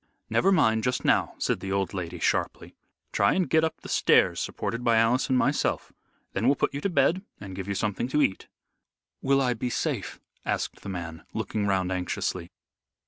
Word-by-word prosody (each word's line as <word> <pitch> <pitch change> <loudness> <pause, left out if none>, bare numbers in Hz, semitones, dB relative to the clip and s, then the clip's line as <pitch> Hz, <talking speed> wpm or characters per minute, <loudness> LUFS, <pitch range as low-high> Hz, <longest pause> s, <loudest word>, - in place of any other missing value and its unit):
"Never 195 - +3
mind 110 - +3
just 125 0 -1
now," - - +2
said - - 0
the 95 - -5
old 95 -1 0
lady, 90 -2 -4
sharply. - - -1 0.4
"Try 100 0 +3
and 185 -2 +1
get 160 0 +3
up 160 - -1
the - - -9
stairs - - +3
supported 115 +1 -3
by 115 -2 +4
Alice 115 +3 +3
and 130 - +3
myself. 140 +3 0 0.4
Then 115 - 0
we'll 140 - +5
put - - 0
you 140 - -4
to 200 - 0
bed 165 +3 +2 0.2
and 95 -2 -8
give 95 0 -5
you 100 - -2
something 105 +3 -1
to 150 +3 +2
eat." 95 - -1 0.7
"Will 135 0 +3
I 125 -2 +2
be 120 +2 -3
safe?" - - -2 0.2
asked - - -2
the - - -7
man, 85 -3 -6
looking 105 -2 -1
round 95 -2 +1
anxiously. 90 -1 -2
110 Hz, 195 wpm, -27 LUFS, 95-135 Hz, 0.7 s, we'll